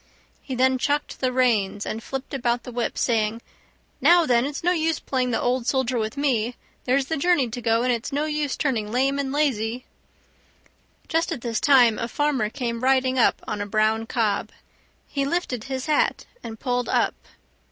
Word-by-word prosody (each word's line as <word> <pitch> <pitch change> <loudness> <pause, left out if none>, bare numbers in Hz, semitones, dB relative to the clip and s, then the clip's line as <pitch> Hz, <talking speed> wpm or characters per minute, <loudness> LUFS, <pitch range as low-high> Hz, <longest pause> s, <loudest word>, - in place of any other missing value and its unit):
He 260 - -5
then 260 +1 +2
chucked 290 +3 -1
the 255 -1 0
reins 220 -6 +1
and 220 - -4
flipped 270 +3 -6
about 240 -2 0
with - - -39
the 250 - -8
whip, 240 0 -2
saying, 225 -2 +1 0.6
"Now, 345 -1 +6
then, 245 -1 +2
it's 290 +2 -6
no 350 - +3
use 325 -2 0
playing 255 -2 -1
the 230 - 0
old 250 0 0
soldier 260 -2 +1
with 220 +5 -3
me; 245 -4 0 0.3
there's 265 +2 +2
the 320 +4 -2
journey 285 -5 +2
to 245 +2 -6
go, 230 0 +2
and 250 0 +2
it's 235 +4 -4
no 290 +2 0
use 300 -2 -2
turning 225 -8 -1
lame 270 +3 +1
and 270 -1 -2
lazy." 250 -5 -1 1.2
Just 325 +1 0
at 240 - -4
this 230 -2 -2
time 250 -6 +5
a 230 - -2
farmer 270 -5 0
came 235 -1 -4
riding 260 0 +2
up - - +3
on 205 - -3
a 205 - -3
brown 220 +2 +1
cob. 225 -5 0 0.6
He 280 - -2
lifted 275 -6 -2
his 265 -1 -4
hat 305 -1 +1 0.2
and 225 -1 -8
pulled 245 -1 -1
up. - - +2
255 Hz, 190 wpm, -24 LUFS, 230-280 Hz, 1.2 s, Now